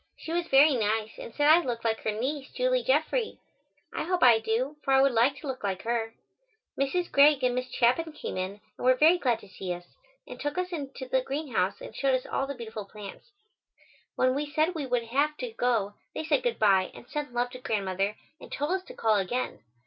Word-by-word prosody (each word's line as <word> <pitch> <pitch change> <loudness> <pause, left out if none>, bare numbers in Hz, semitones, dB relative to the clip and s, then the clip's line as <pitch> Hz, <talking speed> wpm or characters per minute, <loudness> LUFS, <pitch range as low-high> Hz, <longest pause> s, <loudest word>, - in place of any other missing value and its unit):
She 320 - -7
was 345 0 -1
very 280 +1 +6
nice 220 -1 -1
and - - -8
said 290 +4 +1
I 315 +3 +8
looked 240 -6 -4
like 225 -1 +1
her 215 - -1
niece, 265 +6 -3
Julie - - +1
Jeffrey. - - 0 0.6
I - - -2
hope 360 +1 0
I 235 -3 +7
do, 240 +7 -1
for 270 - +2
I - - +6
would 275 0 +5
like 240 +4 +3
to 285 - -9
look 260 -4 -5
like 190 -2 -2
her. 225 -1 -2 0.6
Mrs. 340 +6 -1
Greig 280 -1 +5
and 250 -1 +3
Miss 255 +1 -3
Chapin 255 +8 +2
came 300 - -6
in 190 +2 -4 0.2
and - - -8
were 255 - +6
very 320 +7 +5
glad 245 -7 +1
to - - -14
see 190 -1 -6
us, 175 0 -12 0.4
and - - -9
took 290 +2 -3
us 365 0 -2
out 335 - -2
into 270 -2 -7
the 260 0 +2
greenhouse 255 -8 -2
and - - -9
showed 270 -1 +2
us 255 - -3
all 275 - -2
the 280 - -5
beautiful 220 -4 -7
plants. 205 - -11 0.9
When 255 0 +2
we 290 +2 -2
said 310 +4 +1
we 300 -5 -4
would 245 -2 0
have 285 +6 0
to 250 -3 -5
go 225 -4 0 0.2
they - - -3
said 305 -3 +2
goodbye 205 -5 +3
and 235 - -12
sent 295 -3 -4
love 245 0 -1
to 255 - -9
Grandmother 200 -3 -1 0.2
and - - -13
told 290 +4 -2
us 375 0 0
to - - -11
call 220 -2 +2
again. 240 +6 -2
255 Hz, 225 wpm, -28 LUFS, 225-295 Hz, 0.9 s, I